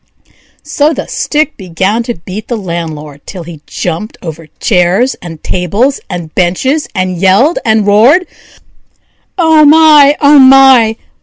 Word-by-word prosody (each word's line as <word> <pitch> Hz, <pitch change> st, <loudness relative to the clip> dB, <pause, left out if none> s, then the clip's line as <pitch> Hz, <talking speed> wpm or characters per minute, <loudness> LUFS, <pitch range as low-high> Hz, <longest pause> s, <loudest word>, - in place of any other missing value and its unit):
So 300 Hz, +1 st, 0 dB
the -, -, -5 dB
stick 300 Hz, -1 st, -2 dB
began 190 Hz, +4 st, -2 dB
to 240 Hz, -, -2 dB
beat 185 Hz, +5 st, -9 dB
the 240 Hz, -, -3 dB
landlord, 160 Hz, -6 st, -7 dB
till 185 Hz, -3 st, -8 dB
he 165 Hz, -2 st, -12 dB
jumped 180 Hz, +5 st, -5 dB
over 165 Hz, -1 st, -8 dB
chairs, 195 Hz, +6 st, 0 dB
and 165 Hz, -3 st, -11 dB
tables, 200 Hz, -, -1 dB
and 165 Hz, -3 st, -7 dB
benches, 260 Hz, -, -1 dB
and 185 Hz, -2 st, -2 dB
yelled 200 Hz, -, +2 dB
and 220 Hz, -2 st, +1 dB
roared: 235 Hz, -, +3 dB, 1.1 s
"Oh 320 Hz, -3 st, +3 dB
my! 300 Hz, -1 st, +5 dB
oh 290 Hz, 0 st, +4 dB
my! 260 Hz, -4 st, +5 dB
210 Hz, 135 wpm, -10 LUFS, 175-275 Hz, 1.1 s, my